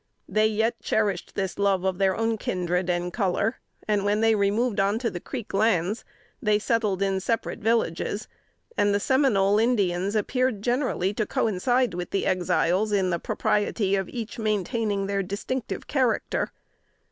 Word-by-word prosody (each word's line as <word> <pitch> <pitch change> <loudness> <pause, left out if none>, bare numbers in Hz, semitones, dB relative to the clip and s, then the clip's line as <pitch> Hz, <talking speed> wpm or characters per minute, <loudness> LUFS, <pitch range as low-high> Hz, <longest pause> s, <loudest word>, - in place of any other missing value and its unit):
They 215 0 +3
yet 220 +2 0
cherished 205 -5 -1
this 190 0 -3
love 195 -2 +2
of 190 -1 -1
their 190 -1 +2
own 225 -1 0
kindred 180 -1 -1
and 175 0 -1
color; 205 +2 0 0.3
and 205 -2 +1
when 205 +1 +1
they 225 0 +4
removed 210 +2 +1
on 200 +2 +2
to 230 -2 -1
the 175 - -5
Creek 240 +4 -7
lands, 200 -1 +1 0.4
they 210 -4 +3
settled 210 -3 0
in 195 -1 +1
separate 225 +5 -2
villages: 220 -2 0 0.5
and 205 0 +2
the - - +2
Seminole 210 -6 +3
Indians 200 -4 +1
appeared 240 0 0
generally 240 -6 0
to 215 0 -1
coincide 240 +3 +1
with 175 0 -4
the 195 - -1
Exiles 185 +3 +1
in 190 -3 +2
the 170 - 0
propriety 205 +1 0
of 190 -2 -2
each 235 -2 -6
maintaining 215 -1 0
their 200 0 0
distinctive 205 +6 -4
character. 260 -5 0
205 Hz, 160 wpm, -26 LUFS, 190-225 Hz, 0.5 s, they